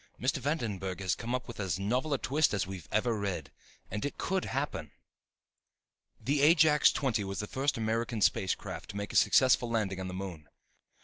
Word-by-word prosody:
Mr. 130 +3 +1
Vandenburg 110 - -2
has 95 -3 0
come 120 +2 -3
up 125 - -4
with 120 - -9
as 95 -5 -1
novel 125 +10 -1
a 140 - +2
twist 145 -2 +1
as 100 - 0
we've 95 -4 -8
ever 115 +2 +1
read._ 95 -7 -3 0.4
And 105 +2 -3
it 145 - -3
could 190 0 -1
happen. - - -3 1.3
The 140 +1 0
Ajax 155 -1 +6
XX 120 -6 0
was 95 0 -5
the 105 - -2
first 135 +6 -1
American 115 +1 -1
space 95 -2 +2
craft - - -8
to 100 - -6
make 100 0 -4
a - - -7
successful 120 +2 +5
landing 105 -5 -1
on 95 - -4
the 90 - -5
moon. 90 -6 -7
110 Hz, 190 wpm, -31 LUFS, 95-130 Hz, 1.3 s, Ajax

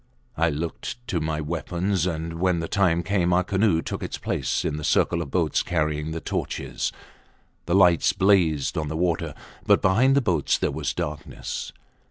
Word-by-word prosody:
I 85 +1 +2
looked 80 +8 -4
to 85 - 0
my 80 0 -2
weapons, 85 +3 -1
and 80 -1 -4
when 90 -1 +2
the 85 - -3
time 85 -3 +2
came 90 -1 +1
our 90 +1 +3
canoe 95 -3 +2
took - - -4
its - - -4
place - - -1
in 75 - -1
the 75 - -6
circle 85 +2 +2
of 75 - -5
boats 80 -1 +1
carrying 75 -3 -1
the 80 +1 -4
torches. - - -3 0.8
The 85 - +2
lights 90 -1 +5
blazed 95 -8 +2
on 75 - -3
the 80 +2 -3
water, 85 -1 -1 0.3
but - - +6
behind 120 +9 +4
the - - +5
boats 85 - +1
there - - 0
was - - -2
darkness. - - -5
85 Hz, 180 wpm, -25 LUFS, 80-95 Hz, 0.8 s, but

